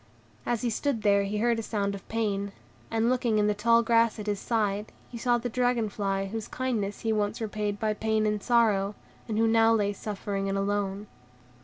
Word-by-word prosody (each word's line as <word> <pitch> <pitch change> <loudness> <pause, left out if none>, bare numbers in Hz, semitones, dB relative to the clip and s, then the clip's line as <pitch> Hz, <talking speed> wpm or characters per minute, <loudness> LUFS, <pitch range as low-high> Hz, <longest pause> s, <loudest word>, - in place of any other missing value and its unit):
As 240 -1 0
he 240 - +1
stood 235 -1 -1
here 200 -1 +4
he 205 +2 -2
heard 230 +1 +2
a - - -1
sound 205 -2 -2
of 195 - -9
pain, 200 -3 -1 0.4
and, 225 0 +1
looking 240 -3 +1
in 210 - +3
the 210 - +2
tall 230 +3 +3
grass 230 -1 +3
at 210 - -6
his 205 -2 -1
side, 210 -2 -1 0.2
he 240 - -6
saw 240 0 +2
the 240 +1 -3
dragon 245 -2 +1
fly 195 -1 -1
whose 215 +2 -5
kindness 225 -6 -2
he 225 -1 0
once 210 0 -1
repayed 210 -2 -3
by 215 -1 +1
pain 220 0 0
and 210 -1 0
sorrow, 210 -4 +2 0.3
and 215 -2 -2
who 225 - +3
now 225 0 +4
lay 205 -2 +1
suffering 200 -1 -4
and 195 - -1
alone. 200 0 -1
215 Hz, 205 wpm, -28 LUFS, 205-230 Hz, 0.4 s, here